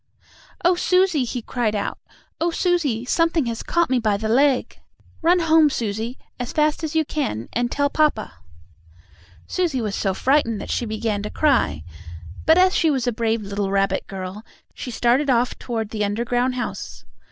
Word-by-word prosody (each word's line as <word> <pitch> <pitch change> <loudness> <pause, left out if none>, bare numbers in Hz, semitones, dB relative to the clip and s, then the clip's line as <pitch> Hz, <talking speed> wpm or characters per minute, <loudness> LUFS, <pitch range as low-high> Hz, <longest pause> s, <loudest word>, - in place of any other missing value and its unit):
"Oh, 355 - +6
Susie!" 365 -5 +2
he 240 0 -4
cried 225 -3 -1
out. 200 - -3 0.4
"Oh, 335 - +1
Susie! 330 -10 0
Something 330 +1 +1
has 230 -1 -3
caught 340 0 +1
me 255 - +3
by 215 -3 +1
the 220 +1 -3
leg! 265 +2 +2 0.4
Run 345 +2 +4
home, 320 -2 +5
Susie, 225 0 -3 0.2
as 245 - -4
fast 305 +1 +1
as 315 0 -3
you 320 -1 +3
can, 120 - -3
and 240 +1 0
tell 285 0 +1
papa!" 295 -7 +1 1.1
Susie 340 -8 -1
was 215 -4 -2
so 195 -1 -1
frightened 255 -5 +2
that - - -6
she 240 - -1
began 215 -1 -2
to 210 - -4
cry, 250 - +1 0.6
but, 320 - +6
as 370 +1 +4
she 325 - +3
was 265 -4 0
a 245 - +1
brave 225 -1 -1
little 200 0 -2
rabbit 195 0 0
girl, 190 +2 -7 0.3
she - - -7
started 245 +4 +1
off 245 -1 +1
toward 225 -3 -4
the 215 -2 -1
underground 245 +5 0
house. 250 - -5
245 Hz, 175 wpm, -22 LUFS, 220-305 Hz, 1.1 s, Oh